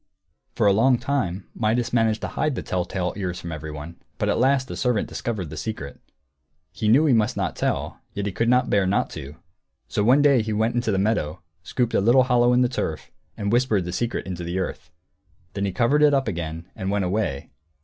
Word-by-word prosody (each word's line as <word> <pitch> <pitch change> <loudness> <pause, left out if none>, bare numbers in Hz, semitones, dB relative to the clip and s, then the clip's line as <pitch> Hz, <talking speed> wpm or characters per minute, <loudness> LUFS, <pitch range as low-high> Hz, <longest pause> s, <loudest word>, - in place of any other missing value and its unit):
For - - +1
a 100 - +6
long 125 +5 +4
time 120 -8 -2
Midas 115 +2 0
managed 115 -2 +2
to - - -3
hide 150 -3 -1
the - - -4
tell 90 -1 -1
tale 90 -2 -2
ears 90 -3 -3
from 85 - -7
everyone; 80 +1 -7 0.2
but - - 0
at - - +1
last 130 +1 +2
a - - -4
servant 125 -5 0
discovered 100 -10 -4
the 80 - -7
secret. 70 - -5 0.7
He 110 - -3
knew 130 +9 +5
he 145 - +4
must 110 -2 +2
not - - -1
tell, - - -2 0.2
yet 100 - -2
he 100 - -1
could 115 +5 0
not 125 0 +3
bear 100 -2 +3
not 100 - +1
to; 70 +2 -8 0.5
so 105 - -1
one 130 +6 +5
day 140 -4 +5
he 110 0 -3
went 110 +2 +1
into 120 -2 0
the 95 - +1
meadow, 95 -7 -1 0.2
scooped 120 +6 -1
a - - +3
little 120 +5 +5
hollow 125 -1 +3
in 125 0 +4
the - - +3
turf, 80 -10 -4 0.3
and 100 0 -2
whispered 115 -6 +2
the 90 - -4
secret 120 +5 -2
into 90 -2 -5
the 85 +2 -3
earth. 95 - -4 0.6
Then 100 0 -2
he 100 - -1
covered 120 +9 +2
it 150 -1 +5
up 135 -2 0
again, 85 -4 -4
and 95 - -3
went 100 -1 0
away. 90 -8 -2
110 Hz, 220 wpm, -24 LUFS, 90-125 Hz, 0.7 s, a